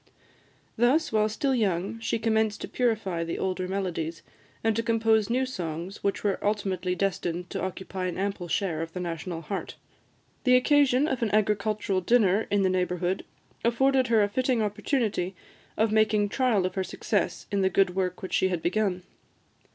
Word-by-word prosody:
Thus, 260 Hz, +8 st, +3 dB
while 215 Hz, -1 st, +2 dB
still 270 Hz, +5 st, 0 dB
young, 200 Hz, -2 st, 0 dB
she 230 Hz, 0 st, -1 dB
commenced 220 Hz, -1 st, +1 dB
to -, -, -4 dB
purify 215 Hz, -8 st, 0 dB
the 165 Hz, -, -3 dB
older 185 Hz, -1 st, -2 dB
melodies, 170 Hz, -4 st, -3 dB, 0.4 s
and 225 Hz, -1 st, +2 dB
to 230 Hz, -, +1 dB
compose 225 Hz, -2 st, +2 dB
new 255 Hz, +2 st, +1 dB
songs, 180 Hz, -5 st, -5 dB
which 200 Hz, -, -1 dB
were 200 Hz, -2 st, 0 dB
ultimately 195 Hz, -3 st, -1 dB
destined 180 Hz, -2 st, -2 dB
to 195 Hz, -, -3 dB
occupy 190 Hz, 0 st, -4 dB
an 180 Hz, -, -4 dB
ample 195 Hz, -2 st, -2 dB
share 165 Hz, -2 st, -1 dB
of 165 Hz, 0 st, -5 dB
the 180 Hz, -, -4 dB
national 170 Hz, -1 st, -4 dB
heart. 190 Hz, +5 st, -5 dB, 0.7 s
The 250 Hz, -1 st, +5 dB
occasion 280 Hz, +1 st, +4 dB
of 265 Hz, -5 st, -2 dB
an 230 Hz, -, +1 dB
agricultural 210 Hz, -2 st, +1 dB
dinner 210 Hz, 0 st, +3 dB
in 205 Hz, -1 st, +2 dB
the -, -, +4 dB
neighbourhood 180 Hz, 0 st, -1 dB, 0.4 s
afforded 260 Hz, +2 st, +3 dB
her 225 Hz, -2 st, +4 dB
a -, -, +2 dB
fitting 255 Hz, +2 st, +1 dB
opportunity 210 Hz, -3 st, -1 dB, 0.4 s
of 220 Hz, 0 st, +2 dB
making 215 Hz, -1 st, +3 dB
trial 230 Hz, -6 st, +2 dB
of 185 Hz, -, -2 dB
her 190 Hz, -, -1 dB
success -, -, -2 dB
in 200 Hz, -1 st, +1 dB
the 190 Hz, -, +3 dB
good 190 Hz, -2 st, +2 dB
work 185 Hz, -1 st, -2 dB
which 185 Hz, -, -5 dB
she 190 Hz, -, +3 dB
had 180 Hz, -3 st, -2 dB
begun. 185 Hz, -1 st, 0 dB
200 Hz, 175 wpm, -27 LUFS, 185-225 Hz, 0.7 s, The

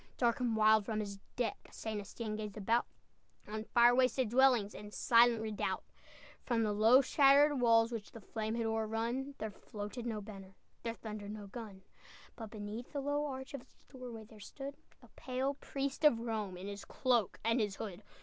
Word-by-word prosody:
Dark 235 Hz, -1 st, +2 dB
and 240 Hz, -3 st, 0 dB
wild, 215 Hz, 0 st, +5 dB
from 215 Hz, +1 st, -2 dB
his 200 Hz, -2 st, -4 dB, 0.2 s
deck 235 Hz, -4 st, -3 dB
St. 215 Hz, -2 st, -4 dB
Estienne 215 Hz, +2 st, -5 dB
gazed 210 Hz, -1 st, -5 dB
about, 225 Hz, +4 st, +1 dB, 0.6 s
On 215 Hz, +1 st, -4 dB
fire 240 Hz, +1 st, +5 dB
wasted 255 Hz, -1 st, +2 dB
dwellings, 245 Hz, -4 st, +4 dB
And 210 Hz, 0 st, -9 dB
silent 230 Hz, 0 st, +4 dB
redoubt; 215 Hz, -2 st, -2 dB, 0.6 s
From 235 Hz, -3 st, +1 dB
the 210 Hz, -1 st, +1 dB
low, 225 Hz, +6 st, +6 dB
shattered 280 Hz, +1 st, +5 dB
walls 230 Hz, -1 st, +5 dB
Which 225 Hz, -3 st, -5 dB
the 230 Hz, -, -10 dB
flame 220 Hz, +2 st, -3 dB
had 230 Hz, -1 st, -1 dB
o'errun, 225 Hz, +5 st, -1 dB
There 215 Hz, 0 st, -4 dB
floated 210 Hz, +4 st, -7 dB
no 220 Hz, -2 st, -2 dB
banner, 195 Hz, -2 st, -10 dB, 0.3 s
There 230 Hz, -1 st, -3 dB
thundered 210 Hz, -2 st, -7 dB
no 210 Hz, -1 st, -7 dB
gun! 200 Hz, -2 st, -9 dB, 0.5 s
But 225 Hz, -2 st, -7 dB
beneath 215 Hz, +3 st, -7 dB
the 285 Hz, -, -1 dB
low 290 Hz, +1 st, 0 dB
arch 265 Hz, +1 st, -6 dB
Of 280 Hz, -, -5 dB
its -, -, -24 dB
doorway 250 Hz, -4 st, -8 dB
there 215 Hz, 0 st, -15 dB
stood 275 Hz, +7 st, -8 dB, 0.3 s
A -, -, -14 dB
pale 260 Hz, +2 st, -2 dB
priest 275 Hz, 0 st, -4 dB
of 295 Hz, -6 st, +6 dB
Rome, 215 Hz, -5 st, -3 dB
In 185 Hz, -, -8 dB
his 200 Hz, 0 st, -6 dB
cloak 240 Hz, -6 st, +1 dB
and 230 Hz, +3 st, +2 dB
his 205 Hz, -3 st, 0 dB
hood. 200 Hz, -2 st, -6 dB
225 Hz, 185 wpm, -34 LUFS, 210-250 Hz, 0.6 s, low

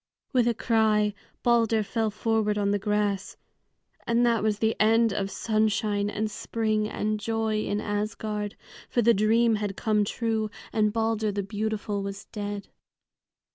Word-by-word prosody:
With 245 Hz, -2 st, +3 dB
a 235 Hz, -, +2 dB
cry 215 Hz, -2 st, +2 dB, 0.3 s
Balder 230 Hz, -2 st, +3 dB
fell 220 Hz, +1 st, -1 dB
forward 215 Hz, 0 st, 0 dB
on 200 Hz, -1 st, +1 dB
the 205 Hz, -, +1 dB
grass. 205 Hz, -1 st, -1 dB, 0.7 s
And 235 Hz, +1 st, +3 dB
that 230 Hz, -3 st, +2 dB
was 210 Hz, -1 st, +1 dB
the 220 Hz, +1 st, +1 dB
end 225 Hz, 0 st, +4 dB
of 195 Hz, -1 st, -1 dB
sunshine 215 Hz, -1 st, 0 dB
and 215 Hz, +1 st, -2 dB
spring 215 Hz, -2 st, -1 dB
and 215 Hz, 0 st, -1 dB
joy 220 Hz, -1 st, -1 dB
in 205 Hz, -, -1 dB
Asgard, 210 Hz, 0 st, -3 dB, 0.3 s
for 240 Hz, -, +1 dB
the 235 Hz, +2 st, +6 dB
dream 225 Hz, +2 st, +3 dB
had 205 Hz, -2 st, -3 dB
come 215 Hz, -2 st, +2 dB
true, 220 Hz, 0 st, -1 dB, 0.2 s
and 215 Hz, -1 st, +2 dB
Balder 220 Hz, -1 st, 0 dB
the 200 Hz, 0 st, -2 dB
beautiful 210 Hz, 0 st, -2 dB
was 195 Hz, 0 st, -6 dB
dead. 205 Hz, -1 st, -5 dB
215 Hz, 150 wpm, -27 LUFS, 205-225 Hz, 0.7 s, the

